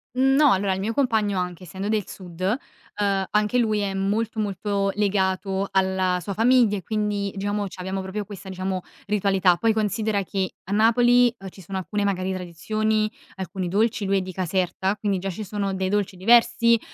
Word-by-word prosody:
Mhmm, 265 +1 +3
no 290 -1 +6
allora, 195 0 +1
il 190 - -3
mio 215 +4 -2
compagno 220 -7 +1
anche 180 0 -4
essendo 190 +3 -5
del 215 -3 0
sud, 180 -2 -10
ehm, 200 -2 -2
anche 210 +3 +2
lui 215 -3 +1
è 200 -1 -1
molto, 210 +4 -1
molto 200 -1 -1
legato 195 -1 0
alla 190 -1 +1
sua 200 +4 -4
famiglia, 225 0 +4
e 190 - -7
quindi 210 -2 -1
diciamo 205 +1 -1
c'abbiamo, 190 +1 -5
proprio 190 +3 -4
questa 195 -1 -9
diciamo 185 0 -3 0.2
ritualità. 195 -3 +2
Poi 225 +4 +2
considera 215 -1 0
che 190 0 -3
a 190 - -8
Napoli, 240 +3 +4
ehm, 195 -2 -8
ci 190 - -14
sono 190 +2 -5
alcune 205 +2 -2
magari 190 -1 -1
tradizioni, 215 +5 -1 0.2
alcuni 190 -1 -4
dolci 215 +3 +1
lui 195 0 +2
è - - +1
di 185 0 -6
Caserta, 185 +2 -1
quindi 200 -2 -1
già 195 +2 -3
ci 195 +4 -5
sono 200 -1 -2
dei 190 0 -1
dolci 205 -1 0
diversi, 235 +3 +4
200 Hz, 185 wpm, -24 LUFS, 190-215 Hz, 0.2 s, no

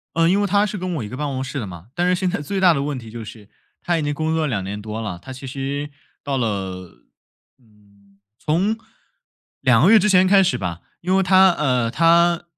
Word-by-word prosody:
嗯， 165 0 +3
因 195 +3 +2
为 205 - +1
他 200 +1 +3
是 210 0 -4
跟 185 -1 -3
我 140 - -3
一 - - -6
个 125 - -8
办 150 +2 -3
公 130 -2 -3
室 135 +1 -5
的 115 - -4
嘛。 90 -1 -10
但 175 +1 +1
是 180 - +3
现 185 0 -1
在 175 -4 -3
最 190 +7 -3
大 185 -2 +5
的 140 -3 -1
问 145 -2 -3
题 115 -2 -11
就 115 +1 -8
是 105 -1 -12 0.3
他 175 -1 0
已 - - -1
经 145 0 -1
工 155 +2 -2
作 160 - 0
了 - - -1
2 105 -8 -2
年 100 +2 -6
多 110 +1 -6
了， 100 -6 -5
他 130 - -10
其 130 +1 -9
实 140 +2 -4 0.3
到 140 -1 -2
了 95 - -4 0.5
嗯， 100 -3 -27 0.2
从 185 - 0 0.8
2 130 -2 +4
个 190 - +6
月 225 - +8
之 210 - +2
前 185 -1 +5
开 195 +1 +6
始 140 -9 0
吧， 90 -4 -5 0.2
因 185 +2 0
为 195 - +3
他 190 0 +6
呃， 125 -8 0
他 170 +5 +3
140 Hz, 255 characters per minute, -21 LUFS, 110-175 Hz, 0.8 s, 月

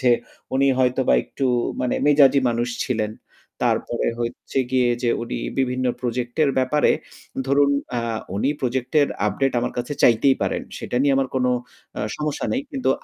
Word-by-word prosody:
যে 130 -2 +3 0.4
উনি 135 +1 +3
হয়তোবা 130 0 +2
একটু 135 - -4 0.4
মানে 125 -1 0
মেজাজী 140 -2 +6
মানুষ 120 +1 0 0.2
ছিলেন। 110 -4 -1 0.5
তারপরে 120 - 0
হচ্ছে 120 +3 -3
গিয়ে 130 -1 +3
যে 120 - +1
উনি 120 - -4 0.2
বিভিন্ন 130 -1 0
প্রজেক্ট 120 0 -3
এর 140 - +2
ব্যাপারে 130 +3 +3 0.6
ধরুন, 140 +1 +4 0.3
আ - - +1 0.4
উনি 105 +8 +1
প্রজেক্ট 130 0 -2
এর 145 - +3 0.2
আপডেট 130 +7 0
আমার - - -2
কাছে 120 +4 -3
চাইতেই 125 +3 +5
পারেন। - - -1 0.2
সেটা - - -4
নিয়ে 140 -1 +3
আমার 135 -1 +1
কোনো 125 -1 +2 0.5
অ - - -2 0.2
সমস্যা 150 -1 -2
নেই। 260 - 0
কিন্তু 265 -2 0
130 Hz, 160 wpm, -22 LUFS, 120-140 Hz, 0.6 s, মেজাজী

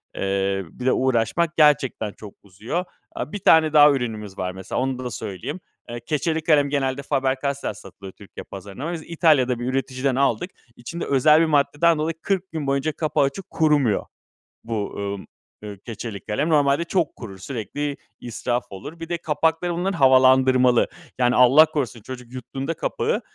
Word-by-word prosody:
eee, 95 0 -1
bir 125 - -8
de 130 - +4
uğraşmak 130 +7 0
gerçekten 140 -8 +3
çok 105 -2 -12
uzuyor. 115 - -4 0.3
Aaa, - - -5
1 205 - -5
tane 160 -3 +4
daha 150 -1 +8
ürünümüz 110 -7 -4
var 90 0 -2
mesela 95 +5 -5
onu 130 -1 -2
da - - -5
da 125 - -4
söyleyeyim. 100 - -6 0.3
Eee, 120 0 -5
keçeli 160 +1 -1
kalem 145 -4 +3
genelde 135 -1 -1
Faber 135 -1 0
Castell 140 0 -2
satılıyor 95 -1 -12
Türkiye 100 - -11
pazarına. 100 - -7
Biz 160 -2 -6
İtalya'da 145 -8 +2
bir 120 - -4
üreticiden 130 0 -1
aldık, 155 +7 0 0.2
içinde 165 +8 -6
özel 150 +3 +4
bir 165 - +4
maddeden 150 +2 +2
dolayı 155 +1 -2
40 190 -1 -2
gün 155 -4 -4
boyunca 140 +3 0
kapağı 155 -1 0
açık 140 +7 -3
kurumuyor. 145 -9 +2 0.6
Bu, 110 -3 -3
ımm, 100 -1 -5 0.4
ııı, 105 -2 -7
keçeli 115 -2 -6
kalem. 125 +10 -1
Normalde 145 0 +3
çok 170 -2 -1
kurur, 100 -5 -9
sürekli 135 +7 -4 0.2
israf 120 +1 -3
olur. 145 - -9
Bir 165 0 -7
de 175 - -1
kapakları 160 +2 0
bunların 180 +2 -2
havalandırmalı, 130 -2 +5 0.3
yani 125 0 +3
Allah 130 +6 +7
korusun 130 -8 -4
çocuk 125 +1 -10
yuttuğunda 135 +5 -5
kapağı - - -2
135 Hz, 165 wpm, -23 LUFS, 120-155 Hz, 0.6 s, daha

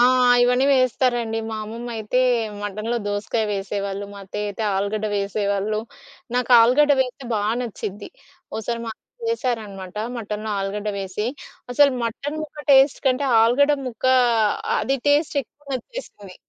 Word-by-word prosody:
ఆ! - - +7 0.4
ఇవన్నీ 250 +2 +3
వేస్తారండి. 240 -3 +1
మా 220 - -3
అమ్మమ్మ 230 +3 -7
అయితే 220 +4 0 0.4
మటనులో 215 +4 -2
దోసకాయ 205 +2 -1
వేసేవాళ్ళు. 200 0 -3
మా 200 - -10
అత్తయ్య 210 +2 -4
అయితే 205 +2 -5
ఆలుగడ్డ 205 +2 -1
వేసేవాళ్ళు. 200 +1 -1 0.5
నాకు 250 0 0
ఆలుగడ్డ 285 +5 +5
వేస్తే 260 +1 -2
బా 210 - +1 0.2
నచ్చిద్ది. 205 -3 -6 0.5
ఒసారి 230 +2 -3
మా 225 - -3 0.4
వేశారనమాట. 210 - -3 0.2
మటనులో 215 -1 -4
ఆలుగడ్డ 205 +2 -3
వేసి. 195 +3 -3 0.5
అసలు 285 +2 +5
మటను 285 +7 -4
ముక్క 300 0 -11
టేస్ట్ 270 +1 +5
కంటే, 260 +2 +2 0.2
ఆలుగడ్డ 285 +6 +4
ముక్క 240 0 -8 0.7
అది 270 +1 0
టేస్ట్ 295 +2 +3
ఎక్కువ 290 +4 -30
నచ్చేసింది. 250 - -8
225 Hz, 130 wpm, -22 LUFS, 205-255 Hz, 0.7 s, ఆ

